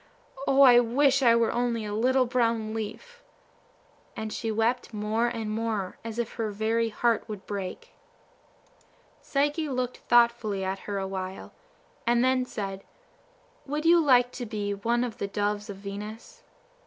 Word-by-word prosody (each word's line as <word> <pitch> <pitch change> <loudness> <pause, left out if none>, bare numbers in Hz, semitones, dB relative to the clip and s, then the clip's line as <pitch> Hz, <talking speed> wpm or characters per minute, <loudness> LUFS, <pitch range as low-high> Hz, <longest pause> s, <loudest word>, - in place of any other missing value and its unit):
O, 275 +1 +6
I 245 -2 +8
wish 270 +3 +3
I 235 -3 +6
were 230 -1 +2
only 235 -2 -1
a 205 - -4
little 255 +4 +3
brown 230 -3 0
leaf!" 475 - -6 1.0
and 220 -1 -4
she 225 - -2
wept 225 +1 0
more 215 +3 0
and 225 -3 -3
more, 215 -4 -3
as 225 0 -6
if 235 -1 -2
her 225 -2 -1
very 220 +2 0
heart 230 +1 +1
would 210 -3 -7
break. 195 -3 -6 1.3
Psyche 295 +2 0
looked 250 -1 -2
thoughtfully 235 -4 +2
at 190 +1 -2
her 200 - -2
a 195 -1 -2
while, 190 0 -6 0.5
and 240 0 +3
then 260 0 +2
said, 195 -4 -5 0.8
"Would 300 +3 -3
you 340 +1 +6
like 250 -3 +4
to 245 -2 -6
be 205 -2 -3
one 235 +4 0
of 245 -1 -5
the 200 - -2
Doves 205 +1 -2
of 200 - -6
Venus?" 205 +3 -8
230 Hz, 155 wpm, -27 LUFS, 210-245 Hz, 1.3 s, I